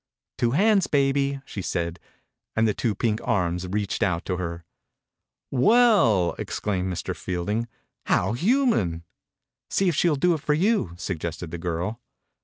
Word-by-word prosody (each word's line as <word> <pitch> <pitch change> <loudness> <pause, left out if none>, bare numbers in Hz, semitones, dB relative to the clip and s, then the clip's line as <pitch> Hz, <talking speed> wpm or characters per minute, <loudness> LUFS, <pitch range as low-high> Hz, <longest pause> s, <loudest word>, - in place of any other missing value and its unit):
" - - -67
Two 120 - +2
hands, 205 -1 +4
baby," 140 -1 +1
she 100 - -6
said, 85 -1 -3 0.6
and 110 0 +3
the 105 - +1
two 110 -1 -1
pink 110 +1 0
arms 90 -6 0
reached 100 +1 -2
out 90 -2 0
to 90 - -2
her. 85 -2 -5 0.9
"Well 165 - +4
I" - - -8
exclaimed 95 -3 -2
Mr. 85 -3 -4
Field 90 +2 -3
ing, 115 +2 -1 0.2
" - - -53
How 95 +5 +2
human! 170 - +1 0.3
" - - -64
"See 195 - +1
if - - 0
she 170 - +3
will 150 - +2
do 175 +5 +3
it 155 - -3
for 150 0 +1
you," 190 - +1
suggested 85 -2 -4
the 85 - -5
giri. 90 +6 -3
105 Hz, 175 wpm, -25 LUFS, 90-145 Hz, 0.9 s, hands